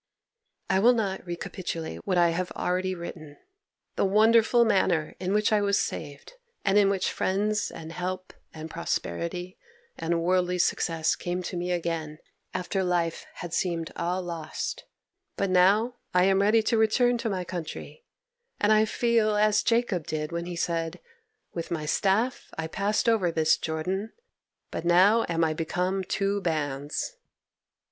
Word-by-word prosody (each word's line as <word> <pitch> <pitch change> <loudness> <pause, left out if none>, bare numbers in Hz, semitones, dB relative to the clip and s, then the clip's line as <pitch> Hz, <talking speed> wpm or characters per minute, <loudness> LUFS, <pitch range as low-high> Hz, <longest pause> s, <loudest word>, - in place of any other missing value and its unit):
'I 190 - +3
will 240 +5 +6
not 200 -5 -2
recapitulate 170 -1 -5
what 185 -2 +1
I 175 -1 +5
have 180 +2 -2
already 185 +1 -1
written—the 175 - -8
wonderful 225 +4 +5
manner 185 -7 +2
in 185 0 -2
which 210 +1 +2
I 210 - +4
was 200 0 +2
saved, 145 - -5 0.3
and 195 -1 +3
in 200 -1 +4
which 195 -2 0
friends, 210 +2 0
and 160 0 -9
help, 185 +2 -4 0.2
and 160 0 -7
prosperity, 175 - -3 0.4
and 165 0 0
worldly 180 0 +2
success 165 -2 +1
came 180 +1 -3
to 180 - -5
me 175 +1 -2
again 165 -3 -2 0.3
after 185 +1 -2
life 175 -2 -1 0.2
had 175 -1 -6
seemed 165 -2 -1
all 180 +2 -1
lost, 165 -3 -5 0.5
but 195 -1 0
now 205 +7 +4 0.2
I 180 - +5
am 195 +1 +4
ready 215 +2 +4
to 225 0 +2
return 240 +2 +3
to 230 - -1
my 185 -3 -2
country, 175 - -7 0.6
and 205 - +3
I 215 0 +5
feel 225 -1 +2
as 210 0 +3
Jacob 230 -8 +1
did 150 0 -3
when 170 0 -3
he 175 - -5
said, 165 -1 -2 0.5
"With 170 -1 -4
my 160 -3 -3
staff 205 - +1
I 160 - -2
passed 200 +8 0
over 210 -7 +3
this 160 -1 +3
Jordan, 185 +7 -3 0.6
but - - -4
now 190 +7 +5
am 165 -1 +1
I 160 -1 +2
become 180 +4 -1
two 200 +2 -1
bands." 150 - -2
180 Hz, 155 wpm, -27 LUFS, 165-210 Hz, 0.6 s, will